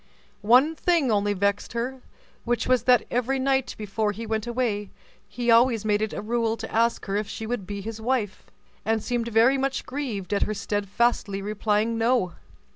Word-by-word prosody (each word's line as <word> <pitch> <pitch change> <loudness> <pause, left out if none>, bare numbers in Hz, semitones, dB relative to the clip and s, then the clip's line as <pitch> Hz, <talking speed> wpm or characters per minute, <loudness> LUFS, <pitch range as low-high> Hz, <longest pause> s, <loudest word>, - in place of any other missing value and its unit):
One 250 +9 +5
thing 330 -7 +2
only 205 -1 +2
vexed 200 +2 -1
her, 250 +3 -3 0.4
which 240 0 0
was 255 -1 +2
that 250 -3 +5
every 250 +2 0
night 265 -1 0
before 210 0 -1
he 225 +3 -6
went 220 0 -2
away, 230 -5 -1 0.4
he 235 +3 0
always 230 -2 +4
made 210 -1 +2
it 220 - -1
a - - -5
rule 230 0 0
to - - -7
ask 230 +1 +1
her 195 0 -1
if 210 -1 -2
she 220 - -5
would 220 -5 -4
be 200 0 -5
his 220 +2 -6
wife, 225 -4 -2 0.4
and 220 0 0
seemed 240 -2 -1
very 235 +4 +4
much 270 0 -1
grieved 240 -9 -4
at 200 - +1
her 215 - 0
steadfastly 205 +1 0
replying 215 +2 0
"No." 230 -6 +2
225 Hz, 185 wpm, -25 LUFS, 205-245 Hz, 0.4 s, One